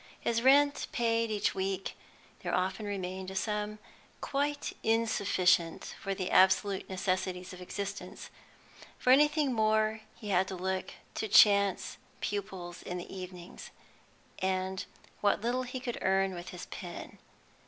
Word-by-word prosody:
His 230 0 0
rent 285 +3 +5
paid 230 -1 +1
each 210 -1 +1
week, 190 0 -2 0.5
there - - -1
often 190 +3 -1
remained 190 -1 -4
a 190 - -7
sum 210 +1 -1 0.4
quite 290 +1 -1
insufficient 200 -6 +2
for 195 0 -2
the 185 -1 -3
absolute 190 +1 +4
necessities 185 -1 -2
of 180 - -10
existence; 200 +2 -6 0.7
for 250 - +3
anything 295 -1 +4
more, 220 0 +2
he 210 - -8
had 190 -1 +3
to 190 - -4
look 185 +1 -3 0.2
to 220 - -2
chance 200 -2 +5 0.2
pupils 190 -4 -4
in 180 - -5
the 175 +2 -7
evenings, 180 -1 -8 0.7
and 190 0 -1 0.3
what 205 0 +2
little 240 +3 0
he 255 0 -5
could 245 -2 -4
earn 190 0 +2
with 175 +1 -7
his 180 - -7
pen. 175 -1 -8
195 Hz, 135 wpm, -31 LUFS, 185-225 Hz, 0.7 s, rent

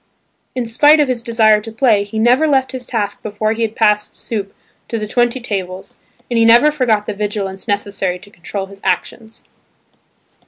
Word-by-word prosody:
In 250 -2 -2
spite 295 +7 +5
of 295 - +3
his 250 -2 -2
desire 220 -3 +3
to 225 +1 -8
play 225 -3 +2
he 205 +2 -7
never 250 +7 +3
left 265 -3 +1
his 255 -2 -6
task 205 -4 -3
before 215 +1 -2
he 225 - -5
had 225 -1 -1
passed 210 -1 +1
soup 200 -4 -5 0.4
to 230 - -3
the 215 -1 -4
twenty 240 +3 +1
tables, 190 -5 -5 0.3
and 235 -2 0
he - - +5
never 235 +7 +6
forgot 235 -8 +1
the 215 - -3
vigilance 200 -2 -4
necessary 200 -3 -1
to 200 +3 -16
control 195 +2 -6
his 195 0 -14
actions. 220 +4 -3
220 Hz, 185 wpm, -17 LUFS, 205-240 Hz, 0.4 s, never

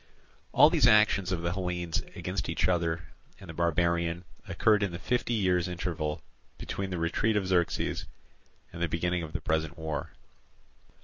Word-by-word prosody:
All - - +7
these - - +4
actions 105 -3 +4
of 85 -2 -2
the 85 0 0
Hellenes 90 -3 -2
against - - -3
each - - +1
other 85 -2 0 0.4
and 95 - -12
the 80 - -7
barbarian 85 +1 0 0.2
occurred 105 -1 +3
in 100 -3 0
the 85 - -5
fifty 120 +3 -1
years' 90 -4 +2
interval 85 -4 -3 0.3
between 95 -1 -4
the 90 - -3
retreat 95 +6 +1
of 100 - 0
Xerxes 90 -2 0 0.7
and 85 - -7
the 85 - +2
beginning 85 +2 0
of 80 -2 -7
the - - -3
present 80 +1 -1
war. 80 -3 -4
85 Hz, 165 wpm, -29 LUFS, 85-95 Hz, 0.7 s, All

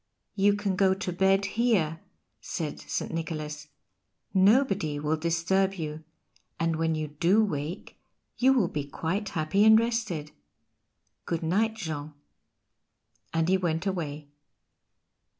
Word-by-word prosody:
"You 205 0 +3
can 205 -2 -1
go 190 0 +3
to 190 -2 -4
bed 195 +2 +3
here," 195 -8 +1 0.4
said 150 +7 -4
St. - - -4
Nicholas, 155 -2 -4 0.7
"nobody 195 - +3
will 150 +2 0
disturb 170 +4 +1
you, 155 -2 -5 0.6
and 165 -1 0
when 160 0 +1
you 155 -1 -3
do 175 +9 +3
wake 160 -1 -4 0.4
you 260 +2 +4
will 245 -9 +3
be 150 -3 -3
quite 165 +8 -3
happy 165 +6 +1
and 220 0 +8
rested. 225 -10 -2 0.9
Good 165 -1 -2
night, 215 +7 +1
Jean." 155 -7 -5 1.2
And 165 0 +1
he 190 +1 +4
went 170 -1 -1
away. 155 -6 -3
170 Hz, 125 wpm, -28 LUFS, 155-200 Hz, 1.2 s, and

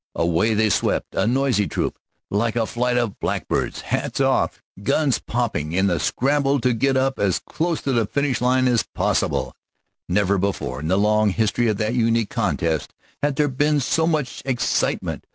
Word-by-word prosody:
Away 85 +6 +1
they 110 0 +2
swept, - - 0
a 95 - +1
noisy 125 -5 +1
troop, - - -3 0.3
like 110 +3 0
a 115 -2 +1
flight 125 +2 0
of 120 -4 -1
blackbirds, - - -2
hats - - -2
off, - - +1 0.2
guns 135 +6 +1
popping, 105 -11 -2
in 95 +1 +2
a 85 - 0
scramble 140 +1 +1
to 125 0 +2
get 135 +3 +1
up 135 0 0
as 100 -3 +2
close 165 0 -3
to 140 - 0
the 115 -5 +1
finishing 140 -2 -1
line 130 0 +3
as 120 -2 +3
possible. - - -1 0.6
Never 100 +1 +2
before 90 -10 -2
in 75 - -4
the 95 +3 +2
long 105 +1 +3
history 110 +4 +1
of 110 -2 +1
that 110 +2 -1
unique 115 -2 +1
contest 85 - -1 0.3
had 145 -1 0
there 150 +1 +2
been 145 +2 +1
so 160 +4 +1
much 150 -7 -1
excitement. 130 -3 -1
115 Hz, 175 wpm, -22 LUFS, 100-135 Hz, 0.6 s, line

